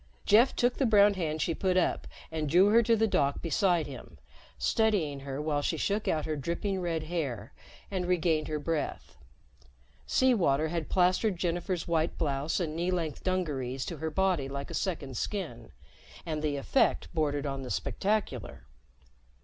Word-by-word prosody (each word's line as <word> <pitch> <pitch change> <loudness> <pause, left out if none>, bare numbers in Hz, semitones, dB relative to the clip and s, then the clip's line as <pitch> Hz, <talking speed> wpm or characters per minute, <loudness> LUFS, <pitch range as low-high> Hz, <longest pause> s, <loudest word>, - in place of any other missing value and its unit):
Jeff 230 +5 +5
took 245 0 +1
the 270 - +2
brown 205 -2 +6
hand 160 -5 -2
she 165 - 0
put 185 +2 0
up 185 - +1 0.2
and 155 -2 -2
drew 180 +6 +5
her 230 +2 +6
to 230 0 +3
the 225 0 +2
dock 140 -9 +1
beside 175 -1 +1
her, 135 -4 -10 0.4
steadying 195 -11 +1
her 135 0 -5
while 150 -1 0
she 160 - -1
shook 205 +6 -1
out 155 -2 0
her 155 - -2
dripping 170 +6 -2
red 165 -3 -1
hair 145 -10 -4 0.4
and 185 -2 -2
regained 165 -3 +1
her 155 - -2
breath. 155 +1 -3 0.9
Sea 260 -1 +4
water 155 - +2
had 165 -2 -3
plastered 185 +2 +2
Jennifer's 175 0 -2
white 165 -1 0
blouse 145 +1 -1
and 160 -3 -2
knee 170 +2 -1
length 165 -5 -2
dungarees 140 -9 -2
to 170 - -5
her 160 +2 -3
body 175 -5 0
like 140 0 -5
a - - -6
second 145 - -3
skin, 145 - -4 0.5
and 155 -2 -3
the 150 -2 -1
effect 200 - +1
bordered 145 -3 0
on 135 -1 -3
the 130 - -7
spectacular. 195 - -2
165 Hz, 170 wpm, -29 LUFS, 145-185 Hz, 0.9 s, brown